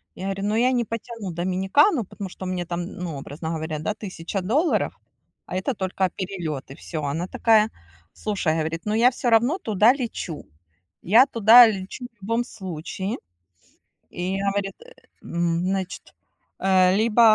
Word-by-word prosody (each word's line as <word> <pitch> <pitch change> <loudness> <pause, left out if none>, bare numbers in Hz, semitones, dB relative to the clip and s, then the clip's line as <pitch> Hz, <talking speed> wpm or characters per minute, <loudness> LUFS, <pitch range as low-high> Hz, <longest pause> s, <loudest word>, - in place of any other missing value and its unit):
Я 185 - -6
говорю: 195 0 -3
"Ну, 210 - 0
я 250 +2 +3
не 240 -2 +1
потяну 230 -3 -6
Доминикану, 190 - +2
потому 200 0 -7
что 185 - -8
у - - -3
меня 180 -1 -2
там, 175 0 -3
ну, 175 -6 -6
образно 150 +4 -6
говоря, 160 -1 -3
да, 160 +8 -2
1000 195 -2 -5
долларов, 275 - +1 0.5
а - - -6
это 190 +8 -1
только 190 -1 -1
перелеты". 165 -8 -5
Всё. 155 0 -6
Она 160 +5 -2
такая, 220 +1 +3 0.4
слушай, 195 -7 -1
говорит: 160 +2 -3
"Но 210 - 0
я 235 +3 +6
всё 245 -1 -1
равно 240 +9 +4
туда 215 - +4
лечу. 230 - -5 0.6
Я 225 +8 +6
туда 230 -1 +8
лечу 200 +4 -4
в 230 -3 -42
любом 230 +4 0
случае". 190 0 -5 1.0
И 185 +2 -2
говорит, 195 0 -1
э, - - -15 0.3
м, 170 -1 -1
значит, 190 -1 -3 0.5
э, 185 -1 +4
либо 225 +1 +3
195 Hz, 160 wpm, -24 LUFS, 175-225 Hz, 1.0 s, туда